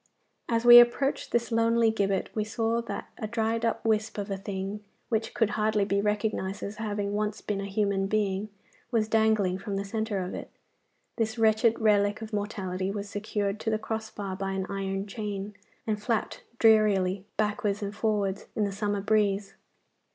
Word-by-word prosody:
As 230 Hz, 0 st, +1 dB
we 240 Hz, 0 st, +12 dB
approached 240 Hz, +4 st, +2 dB
this 235 Hz, 0 st, 0 dB
lonely 230 Hz, 0 st, +3 dB
gibbet 200 Hz, -3 st, 0 dB
we 215 Hz, -, 0 dB
saw 225 Hz, +2 st, 0 dB
that 230 Hz, -, -6 dB
a 215 Hz, -, -3 dB
dried 225 Hz, 0 st, -1 dB
up 230 Hz, 0 st, -1 dB
wisp 220 Hz, -1 st, +1 dB
of 200 Hz, 0 st, -4 dB
a -, -, 0 dB
thing 195 Hz, +1 st, -5 dB, 0.3 s
which 225 Hz, -1 st, -1 dB
could 225 Hz, -3 st, +2 dB
hardly 215 Hz, -1 st, +1 dB
be 200 Hz, 0 st, +1 dB
recognised 210 Hz, -1 st, -1 dB
as 205 Hz, +1 st, -5 dB
having 205 Hz, -2 st, -2 dB
once 210 Hz, 0 st, -1 dB
been 200 Hz, -2 st, -3 dB
a -, -, -4 dB
human 200 Hz, -1 st, 0 dB
being 205 Hz, 0 st, 0 dB, 0.4 s
was 225 Hz, -3 st, +1 dB
dangling 220 Hz, -4 st, +2 dB
from 200 Hz, 0 st, -4 dB
the 200 Hz, 0 st, -2 dB
centre 220 Hz, 0 st, -2 dB
of 185 Hz, -1 st, -3 dB
it. -, -, -6 dB, 0.7 s
This 225 Hz, 0 st, -1 dB
wretched 220 Hz, +1 st, +3 dB
relic 205 Hz, -2 st, +3 dB
of 220 Hz, 0 st, -8 dB
mortality 190 Hz, -3 st, -2 dB
was 200 Hz, 0 st, -4 dB
secured 205 Hz, 0 st, -2 dB
to 220 Hz, -, -2 dB
the 220 Hz, -, +1 dB
cross 220 Hz, 0 st, -4 dB
bar 195 Hz, -3 st, -5 dB
by 195 Hz, 0 st, -3 dB
an 190 Hz, -1 st, -2 dB
iron 195 Hz, 0 st, -2 dB
chain, 205 Hz, -1 st, -5 dB, 0.3 s
and 210 Hz, -2 st, -1 dB
flapped 225 Hz, 0 st, -1 dB, 0.2 s
drearily 200 Hz, -4 st, +4 dB
backwards 210 Hz, -1 st, 0 dB
and 200 Hz, 0 st, -4 dB
forwards 205 Hz, -3 st, -1 dB
in 215 Hz, -, +1 dB
the 200 Hz, -, 0 dB
summer 205 Hz, 0 st, -1 dB
breeze. 200 Hz, -1 st, +1 dB
210 Hz, 180 wpm, -28 LUFS, 200-220 Hz, 0.7 s, we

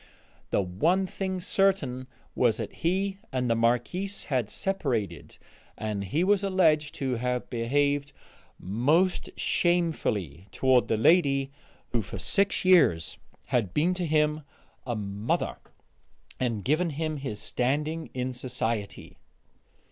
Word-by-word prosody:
The 100 Hz, -, +1 dB
one 160 Hz, -, +1 dB
thing 190 Hz, 0 st, -3 dB
certain 170 Hz, -10 st, +1 dB, 0.3 s
was 120 Hz, -4 st, +2 dB
that -, -, -5 dB
he 190 Hz, +3 st, 0 dB
and 130 Hz, -2 st, -1 dB
the 115 Hz, -, +2 dB
Marquise 125 Hz, -, 0 dB
had 125 Hz, -6 st, -1 dB
separated, 135 Hz, -, -2 dB, 0.4 s
and 105 Hz, -2 st, -3 dB
he 150 Hz, -, 0 dB
was 200 Hz, +1 st, +3 dB
alleged 160 Hz, -6 st, +2 dB
to 130 Hz, -3 st, -1 dB
have 125 Hz, +1 st, -2 dB
behaved 140 Hz, +4 st, +1 dB, 0.5 s
most 145 Hz, -, +1 dB
shamefully 110 Hz, -, 0 dB
toward 130 Hz, +2 st, +3 dB
the 110 Hz, -, +1 dB
lady 140 Hz, 0 st, +3 dB, 0.4 s
who 120 Hz, -, 0 dB
for 100 Hz, -, -7 dB
six 195 Hz, -, +1 dB
years 85 Hz, -, +4 dB, 0.3 s
had 115 Hz, -8 st, -1 dB
been 170 Hz, +5 st, +3 dB
to 180 Hz, -2 st, -2 dB
him 150 Hz, 0 st, +2 dB, 0.5 s
a 120 Hz, -, -1 dB
mother 100 Hz, +1 st, -2 dB, 0.8 s
and 115 Hz, -5 st, -1 dB
given 155 Hz, +5 st, +2 dB
him 155 Hz, +1 st, -3 dB
his 130 Hz, -7 st, -5 dB
standing 150 Hz, +8 st, -1 dB
in 130 Hz, 0 st, -2 dB
society. 115 Hz, -4 st, -3 dB
135 Hz, 125 wpm, -27 LUFS, 115-170 Hz, 0.8 s, years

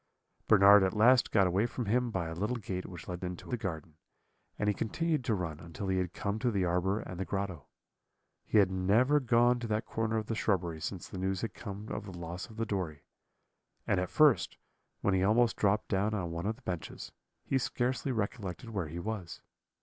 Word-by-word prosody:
"Bernard 100 Hz, -1 st, +8 dB
at 95 Hz, +2 st, +1 dB
last 120 Hz, +4 st, +5 dB
got 100 Hz, -3 st, +4 dB
away 95 Hz, +6 st, +2 dB
from 120 Hz, 0 st, -4 dB
him 120 Hz, +4 st, +1 dB
by 95 Hz, -6 st, -2 dB
a 80 Hz, -, -5 dB
little 105 Hz, +9 st, -1 dB
gate 95 Hz, -5 st, -4 dB
which 90 Hz, -2 st, -10 dB
led 90 Hz, 0 st, -5 dB
into 90 Hz, -1 st, -5 dB
the 125 Hz, -, -1 dB
garden, 80 Hz, -8 st, -5 dB, 0.6 s
and 105 Hz, -, -1 dB
he 105 Hz, -, +3 dB
continued 155 Hz, -, -1 dB
to 115 Hz, -4 st, +1 dB
run 80 Hz, -5 st, -4 dB
until 90 Hz, +4 st, -6 dB
he 95 Hz, 0 st, +2 dB
had 90 Hz, -2 st, -2 dB
come 100 Hz, +2 st, -3 dB
to 125 Hz, -, +1 dB
the 100 Hz, -5 st, +1 dB
arbour 90 Hz, +4 st, +1 dB
and 90 Hz, -1 st, -8 dB
the -, -, 0 dB
grotto. 95 Hz, -5 st, -4 dB, 0.8 s
He -, -, +1 dB
had 95 Hz, -3 st, +5 dB
never 110 Hz, +10 st, +3 dB
gone 120 Hz, -1 st, +3 dB
to 120 Hz, -, -4 dB
that 110 Hz, 0 st, -1 dB
corner 110 Hz, 0 st, -1 dB
of 110 Hz, -, -2 dB
the 115 Hz, -, -3 dB
shrubbery 90 Hz, -7 st, 0 dB
since 90 Hz, +1 st, -5 dB
the 95 Hz, -, -7 dB
news 95 Hz, 0 st, -1 dB
had 110 Hz, -5 st, -3 dB
come 105 Hz, 0 st, -7 dB
of -, -, -4 dB
the 95 Hz, -3 st, -8 dB
loss 85 Hz, +1 st, -6 dB
of 110 Hz, -, -12 dB
the 115 Hz, -, 0 dB
Dory; 90 Hz, -8 st, -3 dB, 0.8 s
and 95 Hz, -, +2 dB
at 90 Hz, -, -2 dB
first, 150 Hz, -5 st, +4 dB, 0.4 s
when 100 Hz, -, +2 dB
he 95 Hz, -, +2 dB
almost 115 Hz, +4 st, +3 dB
dropped 105 Hz, +1 st, +1 dB
down 105 Hz, +2 st, +1 dB
on 90 Hz, -5 st, -3 dB
one 85 Hz, +3 st, -3 dB
of 110 Hz, -, -1 dB
the -, -, -22 dB
benches, 90 Hz, -3 st, -5 dB, 0.3 s
he 135 Hz, -, +1 dB
scarcely 130 Hz, +2 st, -1 dB
recollected 110 Hz, 0 st, -3 dB
where 95 Hz, -7 st, -2 dB
he 80 Hz, +3 st, -7 dB
was. 95 Hz, -1 st, -5 dB
100 Hz, 215 wpm, -31 LUFS, 90-115 Hz, 0.8 s, Bernard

